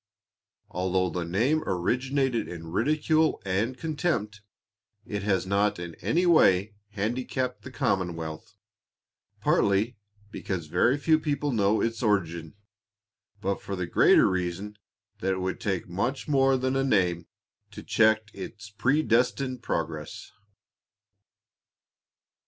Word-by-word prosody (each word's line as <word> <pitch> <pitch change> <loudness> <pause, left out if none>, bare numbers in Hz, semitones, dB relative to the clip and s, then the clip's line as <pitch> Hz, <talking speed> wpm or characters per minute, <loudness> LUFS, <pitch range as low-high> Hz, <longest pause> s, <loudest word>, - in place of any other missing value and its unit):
'" - - -51
Although 90 0 0
the 90 +1 -2
name 125 - +2
originated 125 +6 0
in 85 -2 -8
ridicule 155 - +2
and 105 +7 -1
contempt, 145 - -2 0.6
it 105 -4 -4
has 95 -1 0
not 100 +2 +1
in 85 -1 -6
any 175 +3 +1
way 105 - +4 0.2
handicapped 125 +4 -2
the - - -9
commonwealth, 95 - -3 0.9
partly 105 +5 +2 0.3
because 95 -6 -4
very 90 - +2
few 155 +2 +3
people 145 -1 -1
know 105 -2 +2
its 115 -1 -1
origin, 85 -7 -1 0.9
but 95 +1 -2
for 100 - -5
the 90 -1 -2
greater - - +5
reason, 95 +3 -3 0.4
that 95 +1 0
it 95 - -3
would 95 0 -3
take 95 -4 -2
much 110 +10 -2
more 135 -2 +3
than 130 +1 -1
a 135 - +2
name 90 -9 +1 0.4
to - - -10
check 110 -1 +2
its 105 +2 -9
predestined 125 +1 +1
progress. 80 -7 -4
105 Hz, 120 wpm, -27 LUFS, 95-130 Hz, 0.9 s, greater